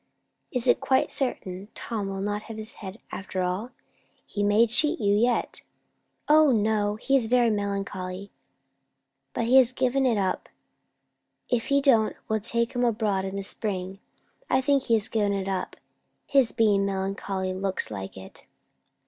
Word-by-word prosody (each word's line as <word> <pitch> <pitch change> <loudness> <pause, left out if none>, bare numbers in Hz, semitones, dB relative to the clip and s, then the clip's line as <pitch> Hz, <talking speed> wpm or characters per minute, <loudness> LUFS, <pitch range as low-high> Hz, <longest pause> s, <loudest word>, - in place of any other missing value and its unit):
Is 250 0 -1
it - - +4
quite 260 - +1
certain 195 -7 -3
Tom 215 -4 -3
will 195 0 -4
not 205 +1 -2
have 225 - -6
his 220 +2 -8
head 195 0 -7
after 190 -1 -4
all? 185 +6 -2 0.6
He 205 - -4
may 205 +3 +4
cheat 300 +8 +2
you 200 0 +2
yet." 235 +3 +1 0.7
"O 305 0 +6
no! 210 -2 +1
He's 260 +1 +1
very 240 -1 +3
melancholy, 200 -2 -4 1.0
but 230 - 0
he 250 +3 +5
has 255 -2 +6
given 260 +1 +1
it 230 -4 +2
up. 190 -2 -1 1.0
If 240 -2 0
he 280 0 +3
don't, 230 -6 +3
we'll 220 0 0
take 235 +3 -1
him 245 -1 0
abroad 210 -5 0
in 190 0 -5
the 200 - -3
spring. 195 -2 -4 0.5
I 260 - +3
think 280 +1 +2
he 230 - +3
has 215 -2 +1
given 205 -2 0
it 195 -1 -2
up. 190 -2 -3 0.5
His 270 -4 +3
being 205 -3 +3
melancholy 195 -1 -2
looks 190 - -2
like 95 -2 -6
it." 95 - -13
210 Hz, 160 wpm, -26 LUFS, 195-240 Hz, 1.0 s, O